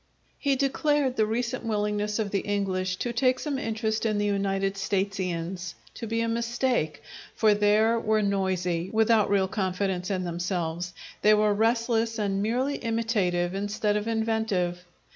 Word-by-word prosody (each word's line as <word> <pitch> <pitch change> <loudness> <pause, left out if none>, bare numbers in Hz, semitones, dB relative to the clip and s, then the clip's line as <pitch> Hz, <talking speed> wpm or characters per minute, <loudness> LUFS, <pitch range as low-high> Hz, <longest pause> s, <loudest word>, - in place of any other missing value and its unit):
He 280 -2 +2
declared 275 0 +1
the 215 -3 +2
recent 235 +2 -2
willingness 210 -1 -1
of 215 -3 -2
the 200 - +1
English 190 -2 -1
to 240 +5 -3
take 255 +1 +2
some 280 -1 -3
interest 220 -2 -1
in 215 -2 +1
the 205 - +1
United 195 -1 0
Statesians 185 -3 -2 0.2
to 230 - -6
be 230 +1 0
a 230 - 0
mistake; 235 - -1 0.3
for 215 -2 +4
their 210 +3 +3
were 215 -1 +1
noisy, 185 -3 0
without 220 -1 +3
real 195 -1 +3
confidence 190 -1 -1
in 185 -2 -1
themselves; 175 0 -3 0.3
they 215 0 +6
were 210 0 +3
restless 230 +1 +1
and 200 -2 0
merely 255 +6 0
imitative 205 -6 0
instead 205 +1 -1
of 210 +1 -1
inventive. 220 -6 0
210 Hz, 150 wpm, -27 LUFS, 190-230 Hz, 0.3 s, they